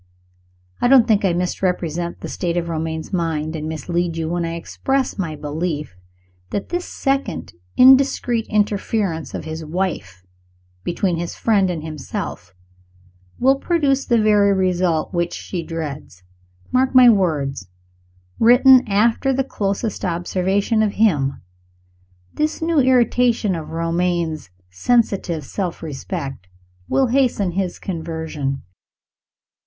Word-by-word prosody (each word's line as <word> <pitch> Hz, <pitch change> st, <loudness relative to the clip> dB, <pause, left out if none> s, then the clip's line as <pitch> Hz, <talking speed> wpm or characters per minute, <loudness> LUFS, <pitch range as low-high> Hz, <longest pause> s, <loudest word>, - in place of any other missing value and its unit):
I -, -, +3 dB
don't 250 Hz, -2 st, +6 dB
think 215 Hz, -3 st, +3 dB
I 185 Hz, -3 st, +2 dB
misinterpret 175 Hz, -1 st, -2 dB
the -, -, -5 dB
state 175 Hz, -2 st, -2 dB
of 170 Hz, -1 st, -2 dB
Romayne's 160 Hz, +1 st, -4 dB
mind, 160 Hz, -3 st, -1 dB
and 155 Hz, 0 st, -4 dB
mislead 170 Hz, +2 st, -2 dB
you, 160 Hz, -1 st, -2 dB
when 175 Hz, 0 st, -1 dB
I 165 Hz, 0 st, -3 dB
express 265 Hz, +9 st, -2 dB
my 165 Hz, -5 st, -2 dB
belief 150 Hz, -, -4 dB, 0.5 s
that 200 Hz, -, -4 dB
this 350 Hz, 0 st, -2 dB
second 270 Hz, -, -2 dB, 0.2 s
indiscreet 255 Hz, -3 st, +5 dB
interference 205 Hz, -, -1 dB
of -, -, -6 dB
his 160 Hz, 0 st, -5 dB
wife 155 Hz, -, -3 dB, 0.6 s
between 175 Hz, -, -1 dB
his 170 Hz, 0 st, -4 dB
friend 200 Hz, -4 st, +2 dB
and 165 Hz, -4 st, -4 dB
himself 130 Hz, -, -6 dB, 0.8 s
will 270 Hz, +2 st, +3 dB
produce 285 Hz, -6 st, +1 dB
the 235 Hz, -2 st, +2 dB
very 210 Hz, -2 st, +4 dB
result 180 Hz, -3 st, 0 dB
which 175 Hz, 0 st, -1 dB
she 180 Hz, -, -5 dB
dreads. 155 Hz, -, -7 dB, 0.5 s
Mark 260 Hz, +1 st, +1 dB
my 255 Hz, -1 st, +9 dB
words, 150 Hz, -, +1 dB, 0.7 s
written 250 Hz, +2 st, +7 dB
after 225 Hz, +6 st, +2 dB
the 270 Hz, +1 st, +1 dB
closest 205 Hz, -3 st, -3 dB
observation 190 Hz, +5 st, 0 dB
of 210 Hz, -2 st, +1 dB
him 150 Hz, -11 st, +1 dB, 0.9 s
this 305 Hz, +1 st, -1 dB
new 325 Hz, -1 st, +1 dB
irritation 245 Hz, -4 st, +3 dB
of 160 Hz, -3 st, -5 dB
Romayne's 165 Hz, -, -1 dB, 0.2 s
sensitive 185 Hz, -, 0 dB
self 180 Hz, -5 st, -4 dB
respect 140 Hz, -, -6 dB, 0.4 s
will 270 Hz, -, +3 dB
hasten 245 Hz, -7 st, +1 dB
his 185 Hz, 0 st, -2 dB
conversion. 160 Hz, -5 st, -4 dB
180 Hz, 125 wpm, -20 LUFS, 160-225 Hz, 0.9 s, my